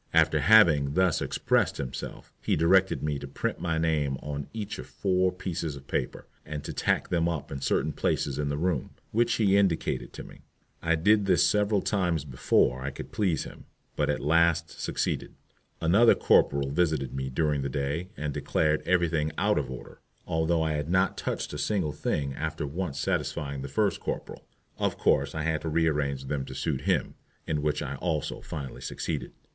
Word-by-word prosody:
After 80 -1 +4
having 75 -6 +5
thus 95 -3 +3
expressed - - +1
himself, 65 -3 -6
he - - +1
directed 95 +3 +3
me 75 -2 -1
to 70 - -7
print 70 - -3
my 85 -2 -1
name 75 -4 +1
on 70 -1 -4
each 110 -2 -5
of - - -7
four 95 -1 +1
pieces 85 -4 -4
of 70 0 -11
paper, - - -3 0.2
and 75 0 -6
to - - -5
tack - - 0
them 85 -1 +1
up 80 -4 -4
in 70 - -5
certain 75 +2 0
places 70 +1 -1
in 75 -1 -1
the 70 - -1
room, 85 -4 -1 0.2
which 120 +2 +2
he 100 -3 +3
indicated 95 -5 +1
to - - -7
me. - - -14 0.4
I 85 0 +2
did 100 +5 +3
this 90 -2 +4
several 105 -1 +2
times 90 -7 0
before 65 -1 +2
I 70 - -2
could 70 - -9
please 95 -7 0
him; - - -11 0.3
but - - 0
at - - 0
last 85 +2 +3
succeeded. - - -2 0.4
Another 100 +8 +5
corporal 70 -1 +3
visited 75 -5 0
me 65 0 -3
during 75 +1 0
the 70 - -2
day 70 +6 -2
and 75 -1 -3
declared 75 +2 +1
everything 85 -4 +2
out - - +2
of - - -4
order, 65 -2 -9 0.3
although 80 0 +1
I 80 - 0
had 75 0 -2
not 95 +1 +2
touched - - -3
a - - -4
single 95 -8 0
thing 70 0 -2
after 80 +2 -3
once 80 +1 -4
satisfying 70 -1 -2
the 70 - -5
first 100 +7 0
corporal. - - -5 0.3
Of - - 0
course 70 +2 +2
I 80 - -2
had 80 -1 0
to 80 - -3
rearrange 75 -4 0
them 70 0 -2
to 65 -1 -9
suit 65 - -2
him, - - +1 0.3
in 75 -1 -1
which 75 0 0
I 70 -1 -4
also 80 -1 -2
finally 70 -4 -7
succeeded. - - -4
80 Hz, 185 wpm, -28 LUFS, 70-90 Hz, 0.4 s, having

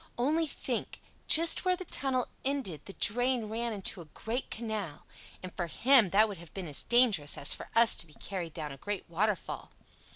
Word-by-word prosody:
Only 310 +7 +1
think—just 330 +2 +2
where 365 0 +3
the 370 - -7
tunnel 260 -5 0 0.2
ended 260 - -3
the 195 - -9
drain 245 +3 +2
ran 230 +2 -3
into 195 -3 -3
a - - -11
great 235 +4 -4
canal; 215 -9 -5 0.4
and 185 - -8
for 175 -2 -3
him 240 - +5
that 210 +4 +4
would 200 -5 -8
have 170 -2 -14
been 190 -3 -5
as 145 - 0
dangerous 225 - +2
as 140 - +2
for - - -9
us 230 -2 +5
to 170 - -4
be 150 - -15
carried 175 -5 -6
down 150 -3 -5
a 135 - -9
great 205 +6 -5
waterfall. 195 +3 -2
215 Hz, 190 wpm, -30 LUFS, 175-250 Hz, 0.4 s, him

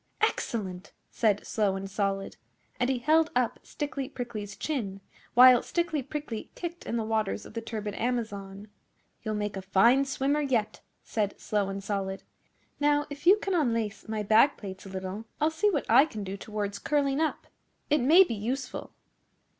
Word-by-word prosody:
'Excellent!' 200 - -2 0.2
said 210 -3 +1
Slow 205 -3 +1
and 195 0 -4
Solid; 195 -1 -2 0.4
and 250 0 +2
he 265 - +1
held 310 +5 +3
up 245 -2 +1
Stickly 285 -2 -4
Prickly's 220 -7 -6
chin, 215 -11 -3 0.4
while 250 0 +9
Stickly 340 -4 -1
Prickly 270 -4 -5
kicked 345 0 -6
in 235 - -1
the 225 - 0
waters 220 -2 -1
of - - -12
the 230 - -3
turbid 215 -2 -4
Amazon. 205 -4 -3 0.5
'You'll 215 -1 -3
make 210 -1 -2
a 195 - -4
fine 230 +8 +4
swimmer 275 +2 0
yet,' 245 -7 0 0.2
said 205 -3 -2
Slow 205 -2 -1
and 195 0 -5
Solid. 195 -1 -3 0.6
'Now, 290 0 +3
if 285 +4 -7
you 390 +3 +8
can 395 -2 -2
unlace 230 - -1
my 215 -1 -2
back 225 +7 +5
plates 190 -1 -8
a - - -9
little, 190 +3 -5
I'll 310 +2 +2
see 370 +7 +2
what 300 -9 -1
I 260 +6 +7
can 215 -9 -6
do 195 0 -5
towards 205 0 -4
curling 280 -1 +1
up. 315 - -1 0.5
It 300 -2 +4
may 320 +9 +7
be 345 - -4
useful. 250 +5 -4
230 Hz, 170 wpm, -28 LUFS, 205-285 Hz, 0.6 s, while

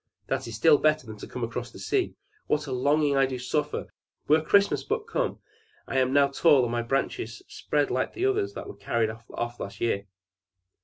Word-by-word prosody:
"That - - -2
is 115 - -6
still 145 +7 +5
better 155 -2 +2
than 110 -1 -9
to - - -9
cross 120 0 -4
the - - -13
sea! 390 -3 -1 0.3
What 150 0 +1
a 140 - -6
longing 145 +3 +2
do 135 - +2
I 135 -1 +2
suffer! 125 +4 -2 0.4
Were 155 +2 +5
Christmas 200 +5 +3
but 435 +1 -2
come! - - -1 0.5
I 135 - 0
am 130 0 +2
now 140 0 +4
tall, 140 -1 +5
and 120 - -1
my 120 0 0
branches 115 -2 -2
spread 145 -1 -1
like 130 +1 -1
the 365 - -1
others 400 0 +1
that - - -6
were - - -8
carried 110 +2 0
off 120 +1 -6
last 100 - -6
year! 100 -4 -1
135 Hz, 200 wpm, -27 LUFS, 120-155 Hz, 0.5 s, still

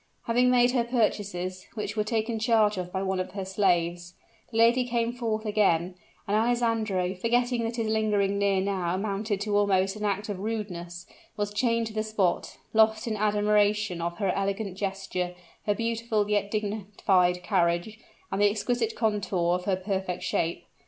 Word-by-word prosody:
Having 245 +1 +3
made 245 0 +4
her 245 -2 +2
purchases, 205 -6 -1
which 215 - -4
were 215 - +1
taken 225 +1 -1
charge 220 -2 +3
of 180 -1 -5
by 190 +1 -2
one 190 -1 -1
of 185 0 -4
the 195 -1 -4
slaves, 175 -3 0 0.3
the 225 - -5
lady 235 +3 +5
came 235 -1 -1
forth 225 -3 -2
again; 190 -5 +2 0.3
and 200 - +1
Alessandro, 225 -5 +1
forgetting 240 +4 +1
that 230 +1 -3
his 230 -2 -1
lingering 210 -2 +1
near 200 -1 +2
now 185 -3 -1
amounted 205 +1 -2
to 205 0 -1
almost 195 -1 +2
an 210 - -6
act 205 0 -1
of 200 -3 -4
rudeness, 180 -5 -5 0.3
was 205 0 -2
chained 230 +1 +1
to 220 - -6
the 215 - 0
spot, 215 -5 -1 0.2
lost 220 0 +4
in 225 -2 -1
admiration 210 -2 +2
of 170 0 -3
her 195 -3 +1
elegant 195 0 -2
gesture, 190 -2 -3 0.3
her 205 - +2
graceful 230 -2 -1
yet 205 -1 +1
dignified 200 -4 +1
carriage, 180 +2 0 0.3
and 195 - -1
the 205 - +6
exquisite 245 - -1
contour 195 -6 0
of 180 0 -2
her 195 - +2
perfect 185 -1 -3
shape. 170 -2 -1
205 Hz, 170 wpm, -27 LUFS, 190-220 Hz, 0.3 s, the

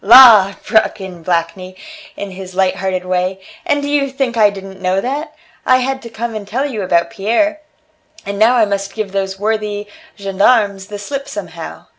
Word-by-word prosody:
"La!" 215 -4 +8
broke 220 -2 +2
in 185 -3 -8
Blakeney, 175 +2 -2 0.4
in 200 -1 -5
his 185 0 -9
light 190 -1 +1
hearted 185 -1 -2
way, 185 +1 -1 0.3
"and 290 0 +1
do - - -2
you 285 -1 +1
think 265 -3 -2
I 215 -2 +5
didn't 195 -1 -10
know 185 +1 +1
that? 295 +7 -4 0.3
I 255 - +4
had 265 +1 -2
to 235 - -9
come 230 +1 -4
and 210 -2 -6
tell 255 +7 -1
you 240 -7 -3
about 175 0 +1
Pierre, 235 +9 0 0.7
and 200 0 -4
now 230 +3 +5
I 230 -3 +4
must 200 -1 -3
give 215 -3 -3
those 195 -1 -2
worthy 210 -1 -1 0.3
gendarmes 200 0 +2
the 210 -1 -6
slip 275 +7 -5
somehow. - - -7
205 Hz, 185 wpm, -16 LUFS, 190-240 Hz, 0.7 s, La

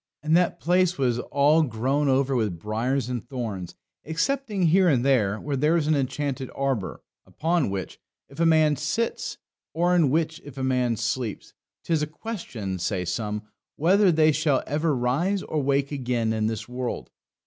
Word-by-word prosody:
And 155 +1 +3
that 175 0 +2
place 180 +1 +2
was 125 -3 +1
all 145 +5 +3
grown 135 +2 0
over 135 0 +2
with 105 -8 0
briars 115 +7 -1
and 125 -3 -3
thorns, 115 -8 -5 0.3
excepting 205 - -1
here 180 +2 +5
and 130 -4 +2
there, 110 -7 +2
where 150 +3 +1
was 165 -3 +1
an 155 - +2
enchanted 140 -1 -2
arbour, 130 -10 -2 0.2
upon 165 - 0
which, 95 -2 -5 0.3
if 140 +3 -14
a 165 - +3
man 155 -2 +4
sits, 150 +11 -2 0.4
or 175 +2 +2
in 165 -6 +4
which 160 +2 0
if 140 -1 -11
a 135 - -3
man 125 -3 +1
sleeps, 110 0 -3 0.3
'tis 160 -3 0
a 150 - 0
question, 145 - -6
say 90 0 -1
some, 105 +4 -3 0.3
whether 190 +5 +4
they 155 -1 +4
shall 150 -2 +1
ever 150 +1 0
rise 150 +11 0
or 155 - -2
wake 140 +1 +1
again 120 -5 -1
in 110 -1 0
this 110 -1 -4
world. 125 0 -4
140 Hz, 170 wpm, -25 LUFS, 120-160 Hz, 0.4 s, here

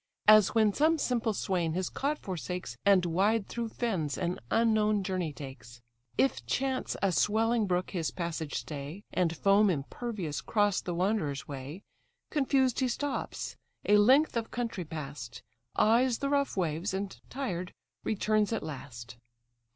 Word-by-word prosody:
As 215 0 +7
when 215 -2 +4
some 315 +6 +3
simple 245 -5 0
swain 180 -5 -1
his 185 +1 -1
cot 290 +2 -1
forsakes, 180 - -5
And 190 -3 +6
wide 195 +5 +2
through 235 -1 -3
fens 185 - -2
an 175 0 -2
unknown 215 -3 +3
journey 185 -4 -2
takes: 130 -4 -10 0.4
If 270 - +2
chance 265 0 -1
a 195 - +3
swelling 220 +5 +2
brook 180 0 0
his 170 -5 -1
passage 170 -3 -4
stay, 145 - -5
And 170 -3 +1
foam 200 +3 +4
impervious 175 - -3
'cross 205 -3 +1
the 175 - -4
wanderer's 175 -7 0
way, 145 +7 -7 0.5
Confused 270 -3 +2
he 260 - +2
stops, 285 +3 -3 0.3
a 210 - +6
length 260 +8 +5
of 230 -1 -1
country 230 -7 -3
pass'd, 150 -6 -7 0.3
Eyes 235 +3 +4
the 280 - -2
rough 280 -5 +1
waves, 170 +2 -1
and 195 0 -3
tired, 185 -10 -3 0.3
returns 215 0 +1
at 225 - -1
last. 120 -5 -8
195 Hz, 145 wpm, -30 LUFS, 165-230 Hz, 0.5 s, As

